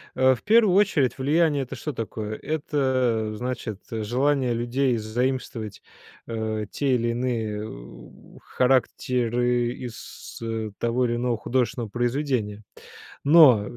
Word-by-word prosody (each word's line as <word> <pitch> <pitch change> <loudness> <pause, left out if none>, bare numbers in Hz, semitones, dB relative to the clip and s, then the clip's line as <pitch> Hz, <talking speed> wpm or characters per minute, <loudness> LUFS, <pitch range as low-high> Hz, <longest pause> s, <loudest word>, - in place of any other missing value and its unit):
А, 130 0 +4
в - - -15
первую 215 -3 +5
очередь, 180 -10 +3
влияние- 145 +1 +2
это 125 - -7
что 150 - -5
такое? 110 -2 -4
Это, 130 -7 0
значит, 120 -3 -4
желание 125 +4 +1
людей 120 +2 0
заимствовать, 115 -1 -3 0.5
э, 110 -2 -3
те 135 -3 +1
или 120 -1 0
иные, 115 -3 -2
у - - -13
характеры 125 -1 +1
из, 120 -3 -9
э, 115 -1 -3
того 120 +2 +1
или 120 -1 0
иного 120 -1 0
художественного 120 -1 -1
произведения. 120 -3 -1 0.6
Но 140 -9 +7
120 Hz, 120 wpm, -25 LUFS, 110-130 Hz, 0.6 s, Но